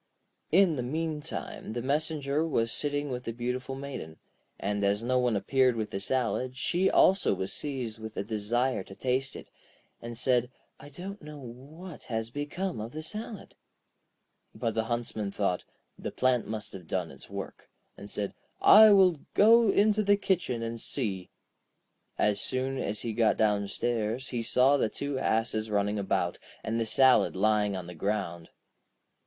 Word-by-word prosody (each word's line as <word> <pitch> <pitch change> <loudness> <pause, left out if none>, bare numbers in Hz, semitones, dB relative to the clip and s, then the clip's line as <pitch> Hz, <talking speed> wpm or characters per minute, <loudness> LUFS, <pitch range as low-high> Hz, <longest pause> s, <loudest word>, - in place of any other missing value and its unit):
In 175 -3 +4
the - - -1
meantime 155 -2 -4
the 120 - -3
messenger 150 +1 0
was 115 -8 0
sitting 145 -1 -1
with 125 0 -4
the - - -2
beautiful 125 +3 -3
Maiden, 135 - -7 0.4
and 100 +1 -1
as 100 +2 +1
no 125 +1 +2
one 125 -3 +1
appeared 130 +4 +2
with 110 -2 -3
the 95 - -3
salad, 130 +3 0
she 180 +9 +1
also 190 - +4
was 95 +1 -3
seized 125 -6 -3
with 110 0 -8
a - - -1
desire 115 +4 0
to 95 - -12
taste 130 +3 -1
it, - - -10 0.5
and 115 0 -6
said: 125 -1 +2 0.3
'I 145 - -12
don't 190 +7 -8
know 150 0 -9
what 145 +7 -11
has 115 -1 -3
become 145 - -3
of 115 +3 -7
the 155 +1 -5
salad.' 215 +4 -6 1.0
But 115 - -2
the 110 0 -1
Huntsman 115 -3 -2
thought: 100 -3 -1 0.3
'The - - -4
plant 125 -3 +1
must 110 0 -4
have 90 -4 -10
done 90 -3 -2
its - - -12
work,' - - -7 0.3
and 100 - -10
said: 105 -1 -2 0.3
'I 220 +1 +9
will 185 -5 +5 0.2
go 230 +1 +6
into 210 +2 +3
the 205 0 +4
kitchen 175 - -1
and 115 0 -4
see.' 100 -9 -2 0.9
As 105 -1 +2
soon 130 +1 -2
as 105 -2 -3
he 115 - -3
got 115 0 +2
downstairs 110 +3 0
he 120 -2 -2
saw 130 +4 +4
the 110 - +1
two 140 +1 -3
asses 110 -2 0
running 105 0 0
about, 90 -3 -1 0.2
and 115 +1 -1
the 115 - 0
salad 130 +1 +5
lying 105 0 +2
on 90 -2 -5
the 90 - -8
ground. 85 -2 -3
120 Hz, 165 wpm, -29 LUFS, 105-145 Hz, 1.0 s, I